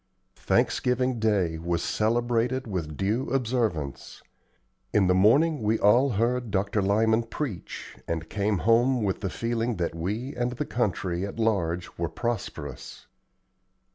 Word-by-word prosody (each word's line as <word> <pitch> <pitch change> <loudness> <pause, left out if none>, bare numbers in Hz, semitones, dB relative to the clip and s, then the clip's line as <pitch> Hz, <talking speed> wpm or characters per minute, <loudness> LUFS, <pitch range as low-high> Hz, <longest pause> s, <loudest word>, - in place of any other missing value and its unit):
Thanksgiving 125 -1 +1
Day 95 -7 +1
was 85 0 -1
celebrated 120 +3 0
with 85 -8 -4
due 110 +7 0
observance. 115 - -2 0.7
In 105 -2 +3
the 90 - +4
morning 135 - +4
we 110 +1 +2
all 120 +8 +4
heard 120 +3 0
Dr. 100 +1 0
Lyman 110 +3 +3
preach, 115 - -6
and 80 -1 -3
came 105 +1 0
home 120 +2 +4
with 95 -2 -1
the 95 - -1
feeling 115 +2 -1
that 85 -3 -2
we 105 - -3
and 120 0 -1
the 140 +5 -3
country 95 -8 -1
at 100 +2 -5
large 90 -8 -1
were 85 -1 -1
prosperous. 80 - -5
110 Hz, 135 wpm, -27 LUFS, 90-120 Hz, 0.7 s, the